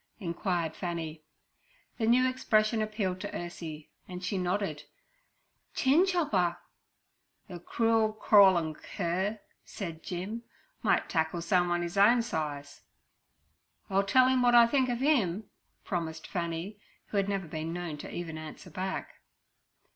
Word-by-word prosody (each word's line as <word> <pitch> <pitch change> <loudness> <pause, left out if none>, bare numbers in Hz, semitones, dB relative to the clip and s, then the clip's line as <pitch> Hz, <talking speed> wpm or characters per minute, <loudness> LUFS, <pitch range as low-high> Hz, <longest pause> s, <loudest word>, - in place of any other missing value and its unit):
inquired 170 -3 -2
Fanny. 165 -3 -4 0.8
The 220 - +1
new 250 +2 +5
expression 220 -3 +2
appealed 210 -4 -2
to - - -4
Ursie, 165 -3 -7 0.2
and 180 0 -7
she 185 +2 -2
nodded 180 -4 -1 0.9
'Chin 310 +7 +4
chopper.' 205 - +1 0.9
'Ther 180 -4 -8
crool 225 +4 +1
crawlin' 190 -7 +5
cur' 190 +7 -2 0.2
said 165 -5 -7
Jim, 190 +6 -5 0.4
'might - - +2
tackle 160 0 0
someun 175 0 +1
'is 175 +3 -2
own 230 +4 +6
size.' 150 -8 -4 1.1
'I'll 195 +1 +4
tell 255 +6 +4
'im 260 -1 +3
wot 245 -1 +4
I 235 -1 +9
think 255 +1 +2
ov 245 +1 -1
'im' 220 - +2 0.4
promised 160 -3 -3
Fanny, 175 +3 -4 0.3
who 205 - -2
had 200 0 +1
never 195 -3 -2
been 160 +1 -4
known 170 -3 -4
to - - -8
even 165 -2 -5
answer 155 +3 -10
back. 185 +3 -5
185 Hz, 130 wpm, -30 LUFS, 170-220 Hz, 1.1 s, I